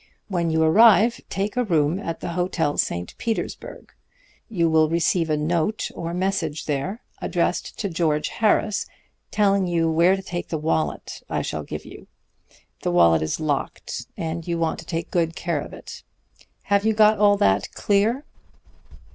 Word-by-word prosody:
When 175 -4 0
you 160 0 +2
arrive, 220 +6 +5
take 200 +2 -2
a 250 - +2
room 165 -4 +1
at 165 -5 -5
the - - -4
Hotel 170 -3 -1
St. 85 0 -2
Petersburg. 225 -1 -5 0.6
You 175 -7 +1
will 160 -1 +3
receive 165 0 +1
a 155 - +1
note 170 +7 -1
or 170 0 -5
message 175 -4 -2
there, 155 - -3 0.2
addressed - - -1
to 205 - -2
George 155 -4 0
Harris, 215 -1 +1 0.4
telling 200 -2 +2
you 165 -2 +1
where 170 +4 +4
to 195 - -7
take 175 -2 -5
the 160 - -1
wallet 155 +1 -2
I - - -1
shall - - -3
give - - -7
you. - - -12 0.7
The - - -1
wallet 85 -2 +5
is 80 0 -2
locked, 150 -3 -3
and 165 0 -4
you 170 -1 -1
want 165 -1 -1
to 165 - -10
take 165 -1 -4
good 165 -2 0
care 170 -4 -2
of - - -9
it. - - -10 0.6
Have 200 0 +2
you 220 0 +2
got 215 -1 +4
all 205 -1 +5
that 95 - +2
clear?' 220 +8 +1
170 Hz, 165 wpm, -23 LUFS, 160-200 Hz, 0.7 s, arrive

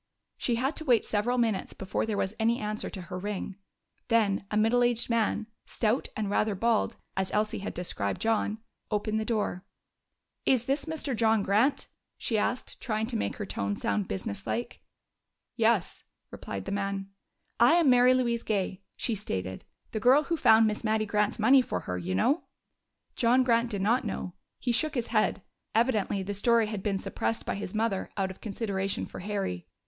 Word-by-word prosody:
She 240 - 0
had 265 +6 0
to - - -2
wait 245 -7 +3
several 220 +4 0
minutes 225 -5 0
before 190 +3 -2
there 215 -2 -1
was 190 +1 -1
any 230 +2 +2
answer 215 0 -3
to 190 - -7
her 180 +1 -6
ring. 200 0 -4 0.5
Then 210 -4 +2
a 210 - -1
middle 225 +3 +3
aged 240 0 +1
man, 220 -1 +1 0.2
stout 225 +3 0
and 215 -1 -1
rather 205 +1 +1
bald, 230 +2 +1 0.2
as 190 -1 0
Elsie 215 +1 0
had 200 - -5
described 100 - -2
John, 220 -1 +1 0.3
opened 215 0 0
the 220 - -2
door. 210 -5 -1 0.8
"Is 250 -3 +3
this 275 +2 0
Mr. 315 -5 -2
John 220 -2 +3
Grant?" 220 +9 +2 0.3
she 230 - -1
asked, 230 +4 -1
trying 220 -3 -1
to 235 +1 -4
make 220 - -1
her 210 - -4
tone 100 - -2
sound 100 -1 -1
business 100 +2 -4
like. 110 +2 -3 0.7
"Yes," - - +1 0.3
replied 95 -1 -6
the - - -4
man. 195 -1 -2 0.5
"I - - +7
am 340 -3 +4
Mary 250 +1 +6
Louise 235 -2 +1
Gay," 195 -4 -2 0.2
she 235 - -1
stated. 95 - -4 0.3
"The 220 - -2
girl 260 +7 +5
who 335 - -1
found 225 -7 +6
Miss 215 +1 -1
Mattie 215 0 +1
Grant's 210 0 +1
money 260 +5 +6
for 245 - -3
her, 90 - -4
you 90 +1 -2
know." 280 - +2 0.7
John 250 +2 +4
Grant 235 -1 +2
did 200 -4 -2
not 235 +6 +3
know; 190 -4 -4 0.3
he 245 - 0
shook 305 +6 0
his 240 -3 -2
head. 215 -4 +1 0.3
Evidently 215 -4 +2
the 205 +2 -3
story 230 +3 +3
had 210 -2 -4
been 200 -1 0
suppressed 225 +3 -2
by - - -1
his 200 0 -5
mother 215 -3 0
out 190 -1 0
of 190 - -13
consideration 200 -2 -2
for - - -9
Harry. 195 - -3
215 Hz, 185 wpm, -29 LUFS, 195-235 Hz, 0.8 s, I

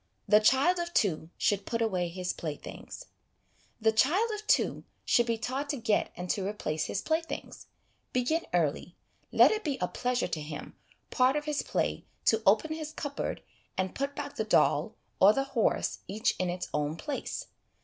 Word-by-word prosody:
The 210 - +7
Child 270 +11 +4
of 345 0 -4
Two 160 -5 +1
should 205 -3 +1
put 230 - -1
away 190 -6 0
his 180 +1 -3
Play 155 -3 -4
things. - - -10 0.7
The 220 0 +4
child 350 - +3
of 425 0 -6
two - - +2 0.2
should 240 0 +3
be 230 -1 +1
taught 265 +5 -3
to 285 - -1
get 225 -3 +1
and 180 +1 -5
to 195 - -1
replace 160 -7 -2
his - - -3
playthings. 325 +1 -3 0.4
Begin 255 +7 0
early. 170 +1 0 0.4
Let - - +7
it 435 0 -1
be 285 -4 -1
a - - 0
pleasure 250 0 -1
to 155 - -3
him, 150 0 -7 0.4
part 255 +1 +3
of 295 0 -1
his 300 -2 0
play, - - -1 0.2
to 220 0 +4
open 225 +11 +4
his 310 -1 -6
cupboard, 285 -1 -4 0.3
and 185 0 -1
put 275 +1 -3
back - - -6
the - - +1
doll - - +2 0.2
or 200 +3 +8
the 270 - +1
horse 270 -5 0
each 215 +4 0
in 185 -1 0
its 180 +1 -3
own 150 +1 0
place. 285 - -4
230 Hz, 180 wpm, -30 LUFS, 185-290 Hz, 0.7 s, or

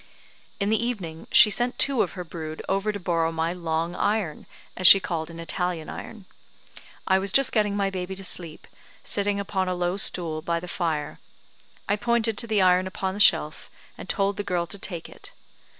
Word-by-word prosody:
In 200 0 0
the 220 +1 +1
evening 180 -10 -5
she 215 -2 +7
sent 245 +4 +1
two 275 -4 +2
of - - -1
her 180 - -6
brood 160 -2 -7
over 195 +2 0
to 205 - -6
borrow 165 -3 0
my 165 +1 -1
"long 165 -1 -2
iron," 200 -5 -2 0.3
as 185 - +5
she 195 - +10
called 165 -4 -4
an 165 0 -10
Italian 170 -1 -3
iron. 220 -4 -9 0.8
I 190 0 +3
was 195 0 -2
just 275 +3 +3
getting 210 -2 +1
my 195 -1 0
baby 185 0 -5
to 195 - -6
sleep, 170 -4 -2 0.4
sitting 200 0 0
upon 190 -2 -2
a 185 - -1
low 175 +1 -1
stool 165 -5 +1
by 170 +1 -1
the 180 - -9
fire. 160 -5 -3 0.7
I 205 - +1
pointed 235 0 +1
to 235 - -3
the 215 -3 +2
iron 185 0 +3
upon 190 0 -3
the 205 - -7
shelf, - - +3 0.3
and - - -11
told 200 -1 0
the 205 - -2
girl 180 -3 -1
to 185 +5 -6
take 175 -4 -5
it. - - -13
185 Hz, 195 wpm, -25 LUFS, 170-205 Hz, 0.8 s, she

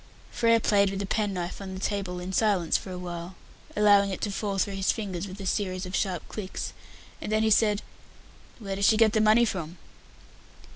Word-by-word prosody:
Frere 230 -1 +3
played 200 -2 +3
with 195 0 -4
a - - -2
pen 210 +1 0
knife 180 +1 -4
on 190 -1 -6
the - - -6
table 195 -3 -2
in 180 +1 -6
silence 195 -6 +2
for - - -1
a 180 - -5
while, 175 0 -6 0.4
allowing 205 -1 +5
it 190 - -4
to 205 - -1
fall 200 0 -2
through 195 +1 0
his 195 0 +1
fingers 200 -4 -4
with 190 +1 -9
a 195 - -6
series 185 -1 -1
of 185 - -4
sharp 185 -5 -1
clicks, 195 -3 -5 0.5
and - - -4
then 215 0 +2
he 220 - +2
said, 210 -1 +3 0.7
"Where 195 -4 -5
does 200 +1 +1
she 220 - +5
get 220 -1 +4
the 220 - +3
money 220 +2 +5
from?" 175 -5 -4
200 Hz, 210 wpm, -27 LUFS, 185-210 Hz, 0.7 s, allowing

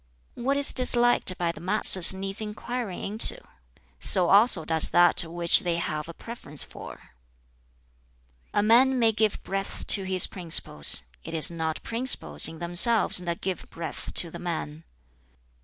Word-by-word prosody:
"What 275 +3 -3
is 285 0 +3
disliked 240 -6 +1
by 170 -1 -3
the - - -14
masses 185 -1 +3
needs 195 +2 -5
inquiring 215 -1 -7
into; 215 +3 +5 0.6
so 180 -3 +5
also 200 -5 +3
does 160 0 -1
that 175 0 +2
which 170 +1 +2
they 175 -1 -3
have 155 -2 -6
a - - -9
preference 155 -11 -8
for. - - -14 1.4
"A 205 - -1
man 255 +4 +2
may 230 -2 +1
give 215 -1 -3
breadth 195 0 -7
to 195 - +3
his 185 -1 +2
principles: 165 - +1 0.2
it - - -9
is 165 +2 +3
not 160 -1 -6
principles 225 - 0
(in 165 - -11
themselves) 175 +7 +2
that 170 -1 -7
give 185 -3 -7
breadth 165 -1 -9
to 170 - +3
the - - -11
man. 160 -2 -7
185 Hz, 150 wpm, -24 LUFS, 170-220 Hz, 1.4 s, into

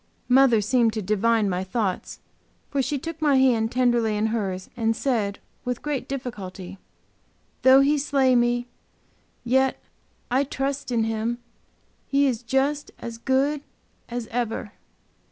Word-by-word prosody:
Mother 250 -3 +5
seemed 230 +1 +2
to 220 - -2
divine 215 +2 +2
my 185 -1 -1
thoughts, 190 -1 -3 0.5
for 280 - +1
she 285 +2 -1
took 325 +3 -7
my 295 -3 +4
hand 240 -4 +3
tenderly 240 -4 +2
in 210 - +1
hers 190 -5 -2
and 225 -1 +1
said, 220 -6 -1 0.3
with 250 -1 -3
great 295 -3 -2
difficulty: 195 -8 -6 0.8
"Though 260 +1 +7
He 290 +2 +3
slay 270 -2 +2
me, 240 0 +2 0.8
yet 265 +2 +2 0.6
will 250 - +3
I - - +3
trust 270 -1 -3
in 230 -2 +2
Him. 225 +1 -1 0.7
He 280 +1 +3
is 245 -4 0
just 270 +4 0
as 230 -1 -7
good 275 +4 +1 0.5
as 240 -1 -4
ever." 225 -3 -2
240 Hz, 140 wpm, -24 LUFS, 220-270 Hz, 0.8 s, Though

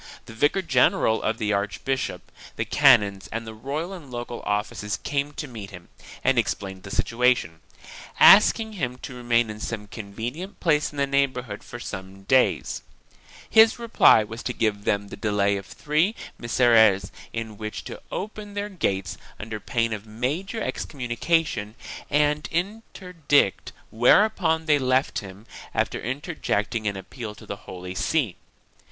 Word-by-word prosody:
The - - -11
vicar 145 +11 +1
general 125 -6 +3
of 110 0 -1
the 105 -1 0
archbishop, 105 +7 -2 0.2
the - - -2
canons 100 -2 +4
and 115 +1 -4
the 110 - -7
royal 145 - -4
and 165 -8 -10
local 120 -1 -6
officials 105 0 -2
came 140 0 -2
to 150 - -5
meet 110 -6 -8
him 90 -3 -12 0.3
and 135 -2 +3
explained 95 -3 -3
the 100 - -10
situation, 120 -8 +1 0.6
ask 210 +4 +8
ing 220 -1 -5
him 125 -10 -3
to 135 - -6
remain 120 -2 +1
in 105 - -9
some 110 -1 -4
convenient 120 - -7
place 150 -4 +2
in 145 - -12
the 140 - +2
neighborhood 130 -6 -1
for 120 - -9
some 95 -3 -8
days. 130 +5 +2 0.7
His 220 0 +6
reply 230 - +5
was 115 +2 -8
to 125 - -3
give 105 -3 -1
them 100 0 0
the - - -7
delay 100 -1 +1
of 100 -1 -6
three 155 +9 0 0.2
Misereres 110 -5 +4 0.2
in 110 -2 -6
which 110 -1 -5
to - - -8
open 205 +1 -6
their 205 0 -3
gates 95 - -2 0.2
under 110 0 -5
pain 115 0 -1
of 110 0 -7
major 150 - -3
excom 135 -10 -4
munication 120 -4 0 0.3
and 150 +1 +1
interdict, 180 - 0 0.2
whereupon 160 - +3
they 150 -2 +4
left 130 +1 +1
him, 100 +2 -11 0.3
after - - 0
inter 140 +9 -4
jecting 110 -5 -1
an 100 - -5
appeal 105 +3 -7
to - - -14
the 100 - -5
Holy 90 0 -7
See. 120 - 0
120 Hz, 155 wpm, -25 LUFS, 105-150 Hz, 0.7 s, ask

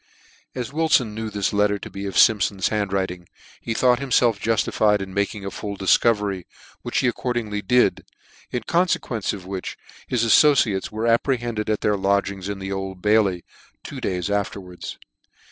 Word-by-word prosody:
As 125 +1 -4
Wilfon 150 -8 +2
knew 110 0 -4
this 100 -1 -1
letter 105 0 +2
to - - -9
be 100 0 -5
of 95 - -4
Simpfon's 100 -3 +4
hand 105 -3 -1
writing, 90 -2 -3 0.3
he 115 - -3
thought 125 -1 +3
himfelf 125 -5 +2
juftified 105 -1 +2
in 95 -1 -6
making 100 0 -2
a 100 - -4
full 100 -2 -6
difcovery, 100 -2 +2 0.4
which - - -3
he 130 - +2
accordingly 120 -4 -2
did, 125 +5 +2 0.5
in 125 - -3
confequence 170 - 0
of 95 -3 -8
which 95 -1 -5 0.3
his 120 -2 0
affociates 115 -6 +4
were 110 +2 -3
apprehended 115 -2 0
at 110 - 0
their 105 -1 +1
lodging 100 0 0
in 100 +2 -4
the 95 0 -6
Old 95 -1 -5
Bailey, 105 -4 +2 0.4
two - - -8
days 90 +1 -2
afterwards. 100 -3 -4
105 Hz, 160 wpm, -23 LUFS, 95-115 Hz, 0.5 s, Simpfon's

